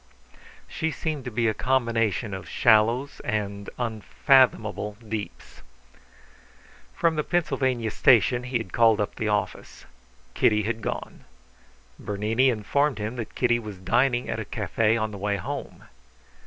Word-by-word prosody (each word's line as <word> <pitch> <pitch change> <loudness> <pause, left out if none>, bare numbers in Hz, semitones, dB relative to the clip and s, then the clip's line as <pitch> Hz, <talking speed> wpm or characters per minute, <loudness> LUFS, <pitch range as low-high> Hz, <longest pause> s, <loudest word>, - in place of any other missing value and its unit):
She 160 - -2
seemed 155 -3 -4
to - - -3
be 115 +1 0
a 110 - +2
combination 115 -4 0
of 95 - -7
shallows 120 +5 +3
and 100 -3 -3
unfathomable 110 -1 +2
deeps. 110 -1 -8 1.3
From 165 -2 +1
the 150 - +1
Pennsylvania 130 -10 0
Station 120 +1 +4
he 125 -1 -1
had 105 -6 -8
called 115 -2 +4
up 105 - -1
the 110 - -3
office. 105 -1 -3 0.5
Kitty 105 +9 +3
had 110 +1 -3
gone. - - -5 0.7
Bernini 110 +6 +1
informed 130 +5 0
him 110 +3 -4
that 115 - -6
Kitty 120 -1 +2
was 105 -4 -8
dining 120 +6 +1
at - - -3
a - - -3
cafe 115 0 0
on 110 -1 -2
the 100 - -8
way 100 0 -1
home. 90 - -6
115 Hz, 140 wpm, -25 LUFS, 105-125 Hz, 1.3 s, Station